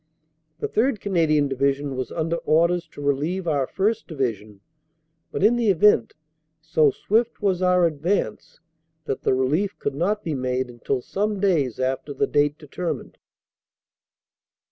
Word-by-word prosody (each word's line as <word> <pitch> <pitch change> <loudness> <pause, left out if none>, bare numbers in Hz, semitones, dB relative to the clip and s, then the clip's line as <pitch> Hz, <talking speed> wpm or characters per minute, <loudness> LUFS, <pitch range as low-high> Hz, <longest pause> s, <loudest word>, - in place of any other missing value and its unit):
The - - -2
3rd. 235 0 +1
Canadian 160 -7 +2
Division 140 +1 -1
was 130 0 -4
under 165 0 -1
orders 170 +2 +2
to 145 - -11
relieve 155 +6 -1
our 140 -5 +1
1st. 220 +3 -1
Division, 110 - -4 0.7
but - - -2
in 230 +4 +5
the 235 -3 +2
event, 185 - +4 0.4
so 155 -1 +3
swift 225 - 0
was 190 -3 +1
our 180 -1 +4
advance 165 +5 -2 0.5
that 135 - -3
the - - +2
relief 155 +10 0
could - - -3
not 200 +9 -1
be 160 - -2
made 130 -1 -2
until 125 +2 -3
some 205 +1 -2
days 160 - +1
after 130 +2 -2
the - - +2
date 145 0 +1
determined. 165 +3 -5
155 Hz, 145 wpm, -23 LUFS, 135-190 Hz, 0.7 s, in